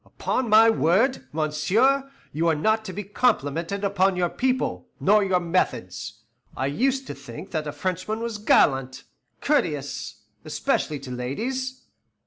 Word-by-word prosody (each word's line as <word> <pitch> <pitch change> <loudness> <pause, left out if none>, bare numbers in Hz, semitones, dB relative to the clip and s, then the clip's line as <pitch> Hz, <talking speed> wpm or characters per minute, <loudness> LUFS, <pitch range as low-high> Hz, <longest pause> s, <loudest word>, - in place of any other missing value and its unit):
Upon 255 -3 -2
my 220 +1 +7
word, 225 - +2
monsieur, 190 - +1 0.2
you 165 +3 0
are 165 - +3
not 220 +8 +1
to 190 - -5
be 205 +2 -5
complimented 195 - 0
upon 195 -1 +2
your 175 -1 +1
people, 260 0 -1
nor 210 +2 +4
your 190 -2 +2
methods. 110 - -2 0.3
I 130 - -1
used 265 - 0
to - - -6
think 140 +5 -10
that 155 -2 -2
a - - -2
Frenchman 185 +5 -3
was 230 -2 -4
gallant, 135 -10 +2 0.4
courteous, 150 - -1 0.2
especially 150 - -1
to 130 -2 -8
ladies." 250 - -4
185 Hz, 140 wpm, -24 LUFS, 150-225 Hz, 0.4 s, my